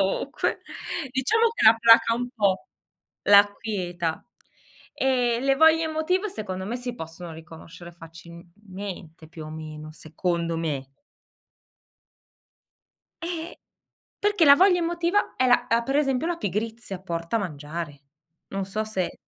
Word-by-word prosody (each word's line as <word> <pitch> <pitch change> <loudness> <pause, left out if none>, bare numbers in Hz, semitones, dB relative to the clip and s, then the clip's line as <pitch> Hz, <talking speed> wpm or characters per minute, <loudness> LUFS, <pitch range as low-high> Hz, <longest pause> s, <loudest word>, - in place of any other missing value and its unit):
Comunque 195 0 -1 0.5
diciamo 440 - +2
che 460 - -2
la 220 +1 +8
placa 230 0 +6
un 245 +1 -3
po', 200 -4 +1 0.6
l'acquieta, 200 -5 +2 0.7
ehm, 245 -3 +1
le 275 0 +3
voglie 320 +2 +5
emotive 320 +6 0
secondo 190 - -5
me 235 +5 -3
si 245 -1 -5
possono 165 0 -8
riconoscere 165 +2 -12
facilmente, 170 +1 -11
più 160 -1 -10
o - - -8
meno, 155 -1 -8
secondo 170 +2 -2
me. 140 -5 -3 2.3
Eh, 335 0 -5 0.6
perché 410 -4 +2
la 280 -2 +9
voglia 365 +3 +5
emotiva 345 +3 0
è 255 - +2
la 245 - +3
uhm, 230 +1 +3
per 270 +2 0
esempio 270 0 +1
la 345 0 -1
pigrizia 215 - -4
porta 170 +2 -3
a - - +2
mangiare. 150 -4 -6 0.5
Non 195 -1 -4
so 215 +3 -2
se 190 -5 -3
205 Hz, 125 wpm, -25 LUFS, 170-265 Hz, 2.3 s, la